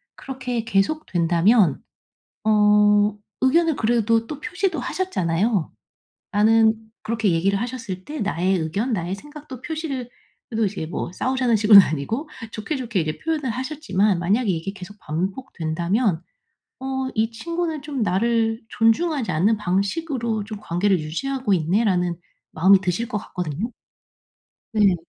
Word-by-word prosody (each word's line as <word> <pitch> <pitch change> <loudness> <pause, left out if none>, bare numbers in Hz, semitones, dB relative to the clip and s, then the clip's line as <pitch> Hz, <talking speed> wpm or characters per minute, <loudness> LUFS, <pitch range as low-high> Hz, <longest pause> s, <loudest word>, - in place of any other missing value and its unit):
그렇게 255 -3 -4
계속된다면 195 - +2 0.6
어 210 -1 +4 0.2
의견을 320 +4 +3
그래도 230 0 +2
또 295 - -6
표시도 365 0 -2
하셨잖아요. 200 - -1 0.6
나는 220 +1 +5 0.3
그렇게 220 -4 0
얘기를 195 +5 +1
하셨을 230 -7 -5
때 300 +6 -7
나의 190 -2 +1
의견, 180 +10 -2
나의 180 -4 -2
생각도 290 0 -11
표시를 290 -6 -4 0.4
그래도 225 -1 0
이제 190 -5 -3
뭐 175 - -4
싸우자는 255 0 +1
식으로는 205 -2 +8
아니고 190 - -3 0.2
좋게좋게 235 - -3
이제 155 -1 -3
표현을 305 -6 -1
하셨지만 235 - 0
만약에 205 +6 +1
이게 175 +2 -1
계속 200 +1 -11
반복된다면 175 - -1 0.6
'어 265 0 -2
이 225 +1 +1
친구는 325 +5 -3
좀 280 -5 -3
나를 225 +3 +1
존중하지 245 +4 +1
않는 195 +8 +3
방식으로 220 - -1
좀 215 0 -7
관계를 185 0 +1
유지하고 245 - -2
있네.'라는 180 0 +1 0.4
마음이 190 +4 +5
드실 190 +6 -1
것 220 -3 -2
같거든요. 180 - -4 1.0
네. 205 -4 +4
215 Hz, 315 characters per minute, -23 LUFS, 185-255 Hz, 1.0 s, 식으로는